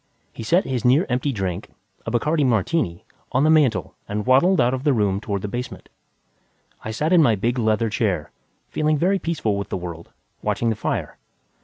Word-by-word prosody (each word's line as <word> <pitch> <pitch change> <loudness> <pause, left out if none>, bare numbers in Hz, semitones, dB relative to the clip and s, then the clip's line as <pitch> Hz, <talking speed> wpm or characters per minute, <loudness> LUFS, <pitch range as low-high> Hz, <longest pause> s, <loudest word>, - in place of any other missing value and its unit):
He - - -8
set 170 - +2
his 130 -3 -2
near 135 +9 +4
empty 125 +3 0
drink 95 -7 -3 0.4
a - - +1
Bacardi 150 +6 +1
martini 115 - 0 0.3
on 130 +2 +2
the 155 - +4
mantel 130 - +2 0.2
and 105 0 -2
waddled 140 +9 +4
out 125 0 +3
of 130 0 -3
the 145 -2 +3
room 100 -4 +1
toward 100 -2 -3
the - - -2
basement. 120 +4 -6 0.9
I - - -5
sat 150 +10 0
in 175 - +7
my 115 -8 +4
big 120 +5 -1
leather 110 0 +1
chair, 95 -9 -1 0.4
feeling 155 0 +1
very 190 +6 +2
peaceful 145 - -1
with 100 - -4
the - - -2
world, 85 -2 -7 0.3
watching 115 -1 0
the - - -1
fire. - - -3
120 Hz, 190 wpm, -22 LUFS, 105-150 Hz, 0.9 s, in